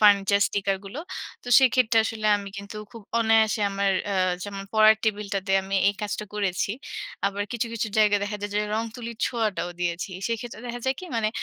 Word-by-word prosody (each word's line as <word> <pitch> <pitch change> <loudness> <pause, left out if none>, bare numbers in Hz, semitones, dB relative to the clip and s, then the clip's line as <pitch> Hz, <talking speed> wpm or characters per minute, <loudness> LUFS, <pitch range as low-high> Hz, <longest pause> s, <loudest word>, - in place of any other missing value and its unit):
Furniture 200 -1 +5
sticker 195 -1 0
গুলো। 200 +10 -6 0.4
তো - - -9
সেক্ষেত্রে 250 -3 +4
আসলে 220 -1 -2
আমি 200 -1 -6
কিন্তু 200 +1 -8
খুব 230 -2 -11 0.2
অনায়াসে 220 -1 +3
আমার 195 0 +1 0.2
আ - - 0 0.3
যেমন 200 -1 -6
পড়ার 215 0 +7
টেবিলটাতে 200 -2 -1
আমি 195 +1 -4
এই 200 - 0
কাজটা 210 +1 -3
করেছি। 195 -2 0 0.6
আবার 200 +1 -1
কিছু, 240 0 -1
কিছু 225 -1 -2
জায়গায় 210 -1 +4
দেখা 210 +1 -3
যায় 205 - -3
যে 210 - +2
রংতুলির 230 +1 -4
ছোঁয়াটাও 215 -7 -1
দিয়েছি। 175 +2 -2 0.2
সেক্ষেত্রে 230 -1 -4
দেখা 240 0 -5
যায় 265 0 +2
কি - - -7
মানে 220 -2 +2
210 Hz, 180 wpm, -25 LUFS, 200-225 Hz, 0.6 s, পড়ার